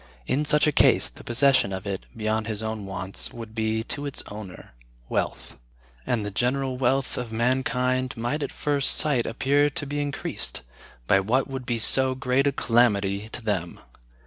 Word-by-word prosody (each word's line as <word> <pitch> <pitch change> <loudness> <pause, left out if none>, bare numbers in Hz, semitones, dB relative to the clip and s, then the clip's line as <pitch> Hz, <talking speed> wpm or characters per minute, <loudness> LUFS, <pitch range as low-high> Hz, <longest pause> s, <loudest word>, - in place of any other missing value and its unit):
In 145 - 0
such 150 0 +5
a 150 - +3
case, - - +4
the - - -14
possession 130 -3 +3
of 95 +1 -5
it, 100 -1 -4
beyond 110 0 -1
his 110 -1 -3
own 110 -2 -4
wants, 95 0 -5
would 115 -2 -9
be, 110 0 -1
to 145 +4 -4
its 140 - -2
owner, 105 -9 -9 0.4
wealth; - - -3 0.5
and 110 -4 0
the 105 - -4
general 130 +4 0
wealth 135 +1 0
of 120 -2 -5
mankind 130 +2 0
might 120 +7 -2
at 140 - -3
first 145 -2 +2
sight 140 -6 +2
appear 140 +5 +2
to 145 0 -4
be 145 +1 -2
increased, 145 - -5 0.4
by 95 - +4
what 120 +7 +1
would 130 -2 -6
be 120 - 0
so 130 +3 +4
great 130 +1 +1
a - - +3
calamity 105 -5 +1
to 120 - -6
them. 95 -6 -2
120 Hz, 175 wpm, -25 LUFS, 110-135 Hz, 0.5 s, such